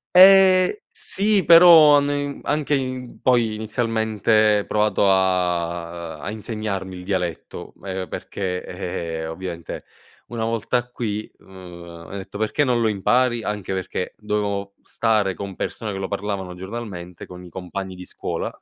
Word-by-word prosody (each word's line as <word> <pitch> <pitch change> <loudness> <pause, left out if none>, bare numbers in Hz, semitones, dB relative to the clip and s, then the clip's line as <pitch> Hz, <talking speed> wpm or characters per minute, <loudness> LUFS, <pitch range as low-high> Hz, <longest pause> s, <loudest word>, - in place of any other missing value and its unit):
Ehm, 185 0 +8 0.2
sì 215 - +1
però, 165 -4 +8
hanno 145 0 +2
in 145 0 -3
anche 150 0 0
in 130 -2 -4
poi 120 -4 +3
inizialmente 110 -1 +1
provato 105 -2 +2
a 85 -3 0
a - - -5
insegnarmi 105 -4 -4
il 90 - -9
dialetto, 90 -4 -4
ehm, 95 -1 -4
perché, 90 -2 -4 0.6
ehm, 80 - -4
ovviamente 85 -1 -7 0.4
una 115 -2 -4
volta 115 +2 -1
qui, 110 -3 -4
mhmm, - - -23 0.6
m'ha 100 - -7
detto: 95 +1 -9
"Perché 110 +7 0
non 125 -4 +1
lo 110 - +3
impari?" 120 +4 +1
Anche 105 -2 -4
perché, 95 -1 -3
dovevo 100 -2 -2
stare 110 -4 +1
con 100 +1 -7
persone 110 -2 -4
che - - -4
lo 95 -1 -3
parlavano 100 -2 -4
giornalmente, 95 -2 -7
con 90 0 -11
i 90 - -11
compagni 95 +2 -6
di 90 - -10
scuola - - -5
105 Hz, 140 wpm, -22 LUFS, 95-120 Hz, 0.6 s, Ehm